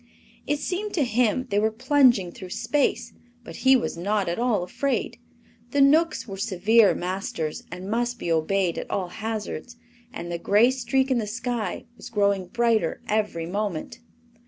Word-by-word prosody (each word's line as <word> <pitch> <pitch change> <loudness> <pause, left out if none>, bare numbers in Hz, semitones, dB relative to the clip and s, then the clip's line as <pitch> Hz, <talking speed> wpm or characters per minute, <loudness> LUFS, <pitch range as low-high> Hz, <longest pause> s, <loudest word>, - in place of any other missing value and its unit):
It 295 - +1
seemed 380 +7 -3
to 310 - +2
him 245 0 +1
they 200 - +3
were 215 +1 +2
plunging 245 -5 +3
through 185 0 -10
space, 285 +9 0 0.3
but - - -9
he 265 0 +5
was 245 - -1
not 200 +3 0
at 170 +4 -2
all 235 -6 +1
afraid. 235 +3 -2 0.5
The 285 - +2
Knooks 305 +2 +4
were 195 -2 -6
severe 205 +2 +3
masters, 180 -4 -3
and 180 +2 -7
must 240 +3 -1
be 170 - -3
obeyed 170 +2 +1
at - - -7
all 185 -3 -2
hazards, 220 +3 -5 0.4
and 175 -10 -6
the 170 - -3
gray 210 +8 +4
streak 265 +1 0
in 250 - +3
the 215 - -3
sky 235 -2 -3
was 245 - -10
growing 200 -4 +1
brighter 230 -4 +1
every 210 -6 -1
moment. 200 +3 -3
220 Hz, 165 wpm, -25 LUFS, 190-245 Hz, 0.5 s, he